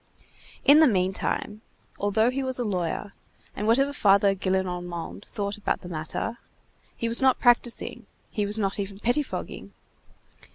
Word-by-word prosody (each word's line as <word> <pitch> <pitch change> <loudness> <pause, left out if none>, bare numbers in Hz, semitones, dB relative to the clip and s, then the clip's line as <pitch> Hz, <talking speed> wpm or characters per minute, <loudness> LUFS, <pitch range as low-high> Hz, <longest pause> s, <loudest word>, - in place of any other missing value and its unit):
In 285 +2 +8
the 315 - +7
meantime, 195 +1 -1 0.4
although 220 +4 +2
he 270 +2 -2
was 260 -1 -1
a 245 - 0
lawyer, 200 0 -2 0.4
and 210 - -3
whatever 275 +5 +3
Father 200 -4 +4
Gillenormand 180 -2 -3
thought 200 0 -4
about 210 - -2
the 180 - -9
matter, 165 +8 -4 0.6
he 230 - -2
was 230 +2 0
not 265 -1 +4
practising, 240 -1 +1 0.2
he 210 - -1
was 205 +2 0
not 200 -1 -1
even 195 0 -4
pettifogging. 245 +7 -3
205 Hz, 140 wpm, -26 LUFS, 190-240 Hz, 0.6 s, In